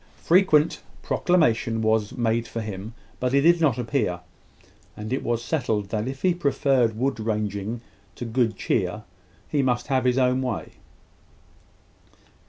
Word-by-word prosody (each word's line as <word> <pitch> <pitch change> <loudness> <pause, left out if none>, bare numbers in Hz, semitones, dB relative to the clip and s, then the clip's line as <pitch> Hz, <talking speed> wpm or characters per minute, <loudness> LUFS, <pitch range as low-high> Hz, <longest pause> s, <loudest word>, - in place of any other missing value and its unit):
Frequent 170 -4 +4 0.2
proclamation 115 -10 +1
was 110 +1 +1
made 115 -1 0
for 115 - -5
him; 105 +1 -6 0.2
but 125 0 -1
he 140 - +5
did 170 +2 +4
not 145 -8 +3
appear; 115 -8 -1 0.8
and 110 +3 -4
it 135 - -1
was 120 0 -1
settled 115 -8 -1
that 110 +2 -2
if 135 0 -6
he 185 -1 +4
preferred 135 -8 +1
wood 135 +1 -1
ranging 105 0 -2 0.3
to 120 - -6
good 115 -1 0
cheer, 100 +1 -1 0.4
he 145 - +1
must 125 0 0
have 130 -2 +1
his 125 0 +2
own 130 0 +2
way. 125 -5 -3
120 Hz, 145 wpm, -24 LUFS, 110-135 Hz, 0.8 s, he